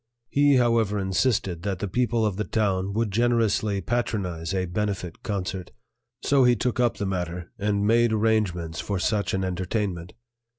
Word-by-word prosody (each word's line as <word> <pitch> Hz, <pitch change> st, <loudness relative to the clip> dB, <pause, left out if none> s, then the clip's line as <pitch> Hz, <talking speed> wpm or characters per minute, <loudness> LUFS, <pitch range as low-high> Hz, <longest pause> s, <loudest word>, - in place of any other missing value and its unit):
He, 145 Hz, 0 st, +4 dB
however, 115 Hz, -4 st, +2 dB
insisted 95 Hz, -2 st, 0 dB
that 100 Hz, -1 st, -2 dB
the 105 Hz, -, -3 dB
people 120 Hz, +1 st, +1 dB
of 105 Hz, -3 st, 0 dB
the 105 Hz, -, 0 dB
town 100 Hz, -3 st, 0 dB
would 115 Hz, -2 st, 0 dB
generously 110 Hz, -2 st, +1 dB
patronize 95 Hz, -7 st, -2 dB
a 95 Hz, -1 st, 0 dB
benefit 90 Hz, -2 st, -3 dB
concert; 95 Hz, -3 st, -4 dB, 0.5 s
so 140 Hz, -2 st, +4 dB
he 125 Hz, -1 st, +5 dB
took 125 Hz, +2 st, -1 dB
up 120 Hz, -2 st, +2 dB
the 100 Hz, -, -2 dB
matter 90 Hz, -2 st, -3 dB
and 100 Hz, 0 st, 0 dB
made 115 Hz, +1 st, +4 dB
arrangements 105 Hz, -7 st, 0 dB
for 100 Hz, -, -2 dB
such 100 Hz, +1 st, 0 dB
an 95 Hz, -, -1 dB
entertainment. 95 Hz, -1 st, -2 dB
100 Hz, 160 wpm, -25 LUFS, 95-115 Hz, 0.5 s, he